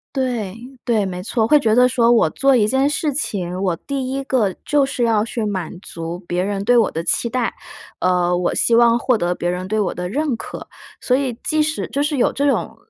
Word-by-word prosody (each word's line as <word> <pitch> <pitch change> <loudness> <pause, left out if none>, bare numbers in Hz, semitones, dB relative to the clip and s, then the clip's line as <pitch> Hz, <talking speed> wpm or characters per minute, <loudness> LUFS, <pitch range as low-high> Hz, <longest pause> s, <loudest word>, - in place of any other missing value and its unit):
对 240 -7 -2 0.3
对， 220 -4 +1
没 180 -1 -5
错。 220 +3 0
会 300 +5 +5
觉 220 -5 +2
得 250 +1 +6
说 240 -2 +3
我 230 -8 +4
做 270 - +3
一 215 -4 +3
件 265 +4 +2
事 295 +1 -1
情， 185 - -3
我 185 -3 0
第 265 +5 -4
一 275 +1 -2
个 245 -7 +1
就 290 -1 +3
是 270 -2 -1
要 225 -3 +2
去 230 0 -3
满 195 -3 -3
足 165 -1 -6
别 175 +1 -1
人 200 0 -2
对 245 +3 +4
我 230 -3 +4
的 165 - -4
期 235 - 0
待， 245 -1 -1 0.5
呃， 180 -1 +2
我 175 0 -1
希 235 - +2
望 235 0 +5
获 250 +1 +1
得 175 -4 -1
别 175 - -3
人 180 +1 -3
对 215 +2 -1
我 200 - 0
的 180 0 -5
认 285 +3 -1
可。 225 - -8 0.3
所 250 - +1
以 260 -3 -2
即 310 -1 +1
使 310 +1 -1
就 280 - -1
是 295 0 0
有 245 - +2
这 285 +1 +1
种 - - -1
230 Hz, 245 characters per minute, -20 LUFS, 190-265 Hz, 0.5 s, 得